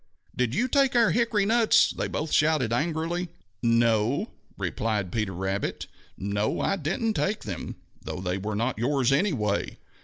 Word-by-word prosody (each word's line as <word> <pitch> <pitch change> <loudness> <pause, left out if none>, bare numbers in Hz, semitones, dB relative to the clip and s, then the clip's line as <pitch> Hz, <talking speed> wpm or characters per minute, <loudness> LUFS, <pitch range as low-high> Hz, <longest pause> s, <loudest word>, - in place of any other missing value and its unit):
"Did 125 0 0
you 250 - +1
take 270 -1 +2
our 235 -2 +5
hickory 225 -4 +2
nuts?" 225 +1 +4
they - - -3
both 155 0 -3
shouted 150 -7 +2
angrily. 165 +5 -1 0.3
"No," 115 - +2 0.3
replied 100 0 -2
Peter, 95 -2 -1 0.6
"no, 100 +2 -1
I - - +1
didn't 195 +7 -1
take 210 +1 -1
them, 95 -6 -5 0.3
though - - -6
they 90 +1 -2
were 105 +2 -3
not 115 +1 -1
yours, 130 +1 +2
anyway!" 135 - 0
130 Hz, 145 wpm, -26 LUFS, -, 0.6 s, our